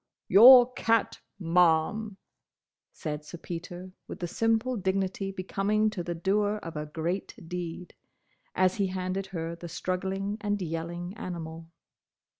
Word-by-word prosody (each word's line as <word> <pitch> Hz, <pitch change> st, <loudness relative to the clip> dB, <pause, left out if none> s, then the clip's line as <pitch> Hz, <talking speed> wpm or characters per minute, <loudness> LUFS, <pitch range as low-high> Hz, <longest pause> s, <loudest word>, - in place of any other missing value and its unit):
"Your 245 Hz, +5 st, +9 dB
cat, 230 Hz, -3 st, +1 dB, 0.2 s
Ma'am," 180 Hz, +4 st, +2 dB, 0.7 s
said 150 Hz, -1 st, -5 dB
Sir 160 Hz, +3 st, -9 dB
Peter 175 Hz, +2 st, -7 dB, 0.2 s
with -, -, -7 dB
the 175 Hz, -, -4 dB
simple 225 Hz, +6 st, +1 dB
dignity 195 Hz, -1 st, -1 dB
becoming 200 Hz, +3 st, 0 dB
to 190 Hz, -, -4 dB
the 175 Hz, 0 st, -4 dB
doer 205 Hz, +4 st, +1 dB
of 165 Hz, -1 st, -7 dB
a 150 Hz, 0 st, -4 dB
great 170 Hz, +5 st, -3 dB
deed, 180 Hz, 0 st, -6 dB, 0.6 s
as 185 Hz, 0 st, +2 dB
he 200 Hz, -2 st, +1 dB
handed 185 Hz, +1 st, -3 dB
her 170 Hz, -3 st, -4 dB
the 170 Hz, 0 st, -9 dB
struggling 190 Hz, +4 st, -3 dB
and 205 Hz, -1 st, -1 dB
yelling 175 Hz, +2 st, -4 dB
animal. 165 Hz, -5 st, -6 dB
185 Hz, 130 wpm, -28 LUFS, 170-205 Hz, 0.7 s, Your